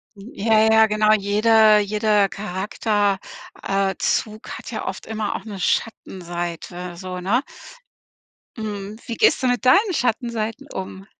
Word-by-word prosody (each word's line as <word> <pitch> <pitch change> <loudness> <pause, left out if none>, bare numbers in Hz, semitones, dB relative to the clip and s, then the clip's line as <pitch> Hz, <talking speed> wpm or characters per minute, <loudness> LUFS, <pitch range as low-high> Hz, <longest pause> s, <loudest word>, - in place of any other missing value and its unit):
Hm. 205 +5 -12
Ja, 220 +1 +2
ja, 220 0 +6
genau. 215 0 +2
Jeder 215 +1 +4
jeder 210 -1 +2
Charakter 205 +1 -1 0.4
äh, 195 -1 0
Zug 215 0 -2
hat - - -9
ja - - -4
oft - - -5
immer 215 -2 -3
auch - - -6
'ne 205 -3 -7
Schattenseite 175 -3 -3
so, 180 +1 -6
ne? 205 +8 +1 1.2
Mhm. 210 -1 -5
Wie 230 - -4
gehst 260 - +3
du - - +3
mit 245 0 0
deinen 380 - +5
Schattenseiten 235 +1 -2
um? 190 0 -7
210 Hz, 140 wpm, -22 LUFS, 195-220 Hz, 1.2 s, ja